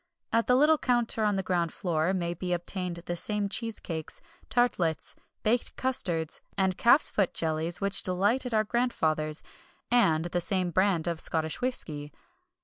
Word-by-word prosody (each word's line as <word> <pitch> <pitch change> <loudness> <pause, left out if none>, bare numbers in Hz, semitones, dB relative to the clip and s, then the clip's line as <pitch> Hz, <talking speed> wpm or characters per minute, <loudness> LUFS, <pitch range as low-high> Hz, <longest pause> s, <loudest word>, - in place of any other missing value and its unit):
At 230 0 +2
the 250 - +5
little 300 +3 +4
counter 240 -3 +1
on 210 -1 +2
the 190 - -1
ground 175 -3 0
floor 170 -2 -1
may 175 -2 -1
be 180 0 -3
obtained 175 0 -3
the 175 - -3
same 210 +3 0
cheesecakes, 195 -7 -4 0.3
tartlets, 180 -10 +1 0.3
baked 235 +3 0
custards, 175 -11 -1 0.2
and 190 -1 +2
calf's 240 +9 +4
foot 195 -4 0
jellies 160 +2 -2
which 200 0 +2
delighted 205 +8 0
our 215 -1 +2
grandfathers, 160 -10 -1 0.5
and 165 -10 +3
the 175 0 -1
same 185 0 0
brand 185 -2 +2
of 170 -2 -2
Scottish 160 +3 +2
whisky. 150 - -4
185 Hz, 150 wpm, -28 LUFS, 165-225 Hz, 0.5 s, the